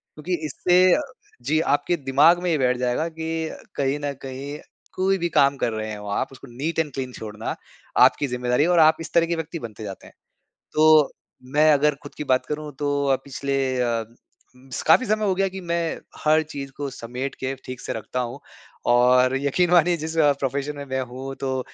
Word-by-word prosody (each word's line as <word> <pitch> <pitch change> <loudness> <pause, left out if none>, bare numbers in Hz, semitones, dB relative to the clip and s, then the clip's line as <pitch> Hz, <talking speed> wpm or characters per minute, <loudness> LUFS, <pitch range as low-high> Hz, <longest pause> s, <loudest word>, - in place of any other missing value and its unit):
क्योंकि 160 +4 -4
इससे 180 +4 +3
अ, 300 - 0 0.4
जी, 150 +6 +1
आपके 145 +3 +1
दिमाग 150 +5 +4
में 180 - 0
ये 155 - +2
बैठ 125 -2 +2
जाएगा 125 +6 0
कि 160 0 -3
अ, - - -9 0.2
कहीं 140 +1 0
न 145 -1 -3
कहीं 135 +2 -6 0.4
कोई 190 +1 +2
भी 175 -1 -1
काम 140 0 +4
कर 115 - -1
रहे 110 0 -4
हो 105 0 -9
आप - - -3
उसको 135 +1 -13
नीट 160 +5 -2
एंड 150 -4 -1
क्लीन 130 -2 -4
छोड़ना, 110 -1 -5 0.4
आपकी 145 - +5
ज़िम्मेदारी 125 +2 +1
है 170 - +2
और 175 -1 +4
आप 155 0 +6
इस 160 -1 -8
तरह 170 -1 +4
के 170 - 0
व्यक्ति 165 +1 -5
बनते 110 -3 -8
जाते 95 -2 -8
हैं। - - -17 0.6
तो 155 -1 +5 0.4
मैं 155 +1 +6
अगर 150 +1 +3
खुद 145 - -11
की - - -4
बात 130 - +1
करूँ 150 0 -4
तो 145 - -1 0.2
अ, 135 - +4
पिछले 140 0 -3 0.3
अ, 115 -2 0 0.5
उम, 130 +1 -19
स - - -3
काफ़ी 255 - +6
समय 215 0 +1
हो 195 - +2
गया 195 +1 +2
कि 190 +1 -7
मैं 170 -1 -2 0.2
हर 155 +1 +4
चीज़ 140 -1 -6
को 145 -1 -3
समेट 125 +3 -5
के 130 +1 -2
ठीक 130 -1 -7
से - - -4
रखता 110 +3 -4
हूँ। 125 +3 -5 0.5
और 125 +1 +4
यकीन 155 +6 +1
मानिए 175 0 +4
जिस 160 +1 -5
अ, 145 -2 +5
प्रोफेशन 140 +2 -2
में 140 - -6
मैं 130 -1 -2
हूँ 135 +1 -6
तो 130 -1 -1
145 Hz, 215 wpm, -23 LUFS, 130-160 Hz, 0.6 s, आप